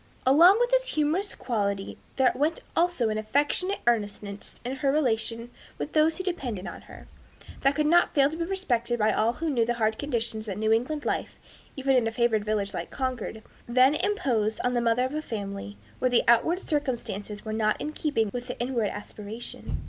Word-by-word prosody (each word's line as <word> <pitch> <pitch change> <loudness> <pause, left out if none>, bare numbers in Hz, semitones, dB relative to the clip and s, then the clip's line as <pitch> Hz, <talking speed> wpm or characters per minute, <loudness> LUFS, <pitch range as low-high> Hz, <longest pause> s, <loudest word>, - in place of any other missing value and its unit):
Along 340 - +7
with 485 0 +2
this - - +3
humorous 335 +2 0
quality 200 -4 -2 0.2
there 260 -2 +4
went 295 +6 0
also 335 -9 +2
an 215 0 -1
affectionate 290 - 0
earnestness 205 -3 -1
in 260 +2 -3
her 270 +1 +1
relation 235 -4 0 0.3
with - - -5
those 315 +1 +3
who 375 - -3
depended 250 - -3
on - - -8
her, - - -12 0.5
that 275 +1 +3
could 305 0 +1
not 345 +3 +4
fail 275 -2 +5
to - - -5
be 335 - -2
respected 250 -11 -1
by 215 -1 +3
all 225 +2 +2
who 330 +6 -4
knew 240 -4 +2
the 240 +1 0
hard 220 -1 0
conditions 230 -5 -3
that 195 - -4
New 220 +1 +1
England 280 +6 -1
life, - - -2 0.4
even 270 0 +2
in 240 -3 +3
a - - -1
favored 225 -2 +1
village 210 -2 -1
like - - -4
Concord, 250 -5 -4 0.2
then 255 +3 +5
imposed 255 - 0
on 245 - +1
the 240 - +1
mother 235 +2 +2
of 260 - -4
a 305 - -2
family, 200 - -6 0.2
where 255 - +2
the 245 - +3
outward 235 +10 +4
circumstances 235 - -3
were 215 - -3
not 215 -1 +1
in 300 - -3
keeping 270 -10 -1
with 245 0 -5
the 250 - -6
inward 240 -4 0
aspiration. 210 +2 -7
245 Hz, 195 wpm, -27 LUFS, 220-295 Hz, 0.5 s, Along